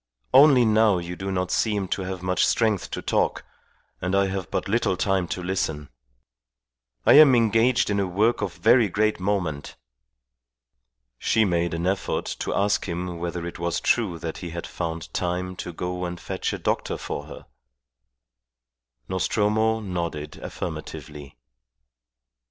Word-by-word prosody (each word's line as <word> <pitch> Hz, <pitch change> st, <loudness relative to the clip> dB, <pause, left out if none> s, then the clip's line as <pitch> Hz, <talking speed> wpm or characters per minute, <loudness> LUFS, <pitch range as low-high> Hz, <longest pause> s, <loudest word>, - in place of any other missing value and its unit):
Only 135 Hz, -3 st, +7 dB
now 110 Hz, -2 st, +4 dB
you 90 Hz, 0 st, -5 dB
do 95 Hz, +2 st, -4 dB
not 90 Hz, -1 st, -1 dB
seem 105 Hz, -4 st, 0 dB
to -, -, -1 dB
have 95 Hz, -1 st, -5 dB
much 90 Hz, 0 st, +1 dB
strength 110 Hz, -4 st, +1 dB
to -, -, -5 dB
talk, -, -, 0 dB, 0.6 s
and 90 Hz, +2 st, 0 dB
I 100 Hz, 0 st, +3 dB
have 95 Hz, -3 st, -4 dB
but -, -, -2 dB
little 100 Hz, -3 st, +1 dB
time 95 Hz, -2 st, +1 dB
to 90 Hz, -, -4 dB
listen. 80 Hz, -6 st, -2 dB, 1.2 s
I -, -, +7 dB
am 140 Hz, -4 st, +8 dB
engaged 115 Hz, 0 st, +3 dB
in 100 Hz, -, +1 dB
a 100 Hz, -, 0 dB
work 105 Hz, +6 st, +1 dB
of -, -, -3 dB
very 115 Hz, -1 st, +4 dB
great 105 Hz, +2 st, +1 dB
moment." 90 Hz, -7 st, -2 dB, 1.4 s
She 110 Hz, -1 st, +2 dB
made 85 Hz, -2 st, 0 dB
an 85 Hz, +1 st, -3 dB
effort 95 Hz, +1 st, -1 dB
to -, -, -2 dB
ask 100 Hz, +1 st, +1 dB
him 90 Hz, -1 st, -4 dB
whether 85 Hz, 0 st, -4 dB
it 85 Hz, -, -7 dB
was 85 Hz, 0 st, -1 dB
true 105 Hz, -8 st, +1 dB
that 80 Hz, -1 st, -6 dB
he 90 Hz, -, -6 dB
had 85 Hz, +1 st, -6 dB
found 85 Hz, -1 st, -5 dB
time 90 Hz, +1 st, -2 dB
to 90 Hz, -, -5 dB
go 90 Hz, +2 st, -4 dB
and 90 Hz, 0 st, -5 dB
fetch -, -, -3 dB
a -, -, -3 dB
doctor -, -, -1 dB
for 70 Hz, -, -5 dB
her. 80 Hz, -, -11 dB, 1.6 s
Nostromo 110 Hz, +4 st, +1 dB
nodded 85 Hz, -6 st, -4 dB
affirmatively. 75 Hz, -4 st, -7 dB
95 Hz, 150 wpm, -24 LUFS, 85-105 Hz, 1.6 s, am